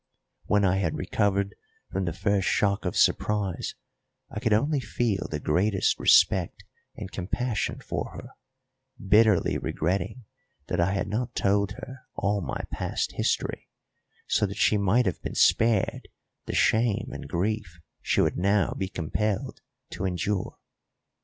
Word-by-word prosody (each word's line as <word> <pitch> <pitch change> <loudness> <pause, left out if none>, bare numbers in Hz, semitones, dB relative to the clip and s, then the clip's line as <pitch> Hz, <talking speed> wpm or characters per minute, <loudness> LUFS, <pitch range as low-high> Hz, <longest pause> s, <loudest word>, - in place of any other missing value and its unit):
When 105 -1 +3
I 95 0 +3
had 85 -5 -1
recovered 100 -1 0 0.4
from 95 - -1
the 85 - -1
first 100 +2 0
shock 100 0 +1
of 90 - -2
surprise 100 -4 +1 0.6
I - - -4
could 115 0 0
only 140 +8 +2
feel 110 -3 -1
the 75 - -3
greatest 95 +7 +1
respect 90 -3 +4 0.3
and 95 - -7
compassion 105 +5 -2
for - - -4
her, - - -9 0.7
bitterly 105 -1 +3
regretting 100 +8 -2 0.5
that - - -1
I 85 +3 +2
had 100 - -1
not 110 +4 -3
told 100 0 +1
her 130 +2 -9 0.2
all 100 0 0
my - - -4
past - - -2
history, - - -2 0.6
so 105 - +1
that 100 +1 -7
she 105 - +3
might 105 +5 +3
have 90 - -2
been - - -5
spared 115 -4 +3 0.4
the - - -3
shame 115 +1 +2
and - - -7
grief 95 -1 -2 0.2
she - - +2
would - - +1
now 100 +2 +2
be 95 - -2
compelled 95 +4 -2 0.3
to 95 - -4
endure. 95 +1 -2
100 Hz, 145 wpm, -27 LUFS, 95-110 Hz, 0.7 s, respect